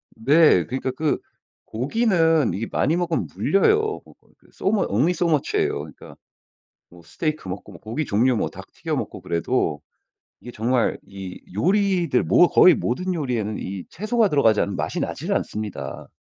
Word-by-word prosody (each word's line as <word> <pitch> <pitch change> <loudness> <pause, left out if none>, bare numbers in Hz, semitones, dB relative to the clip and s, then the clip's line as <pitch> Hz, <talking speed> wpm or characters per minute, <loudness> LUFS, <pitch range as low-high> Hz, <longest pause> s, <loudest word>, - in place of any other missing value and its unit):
네. 140 - +4
그러니까 130 +1 -3
그 150 +4 -1 0.5
고기는 165 - +1
이게 110 +4 -3
많이 160 - +1
먹으면 175 -2 -1
물려요. 425 - +3 0.3
어 - - -17
그, - - -29
그 - - -26
So - - -1
mu 215 0 +1
only 130 - +2
so 175 0 0
much 150 -4 0
예요. - - 0
그러니까 75 0 -11 0.8
뭐 85 0 -16
스테이크 155 - -4
먹고 100 +2 -7
뭐 85 - -13
고기 115 +8 -3
종류 120 +2 +2
뭐 - - -1
닭 - - -12
튀겨 - - -3
먹고 - - -5
그래도 85 -3 -1 0.6
이게 120 - -9
정말 120 +2 0
이 95 -2 -9
요리들 185 - +2
뭐 175 - +5
거의 180 - +7
모든 180 +12 -2
요리에는 120 - -2
이 95 -1 -6
채소가 215 +3 +1
들어가지 115 - +3
않으면 100 - -2
맛이 - - -3
나질 - - -3
않습니다. 105 -2 -4
130 Hz, 365 characters per minute, -23 LUFS, 105-175 Hz, 0.8 s, 거의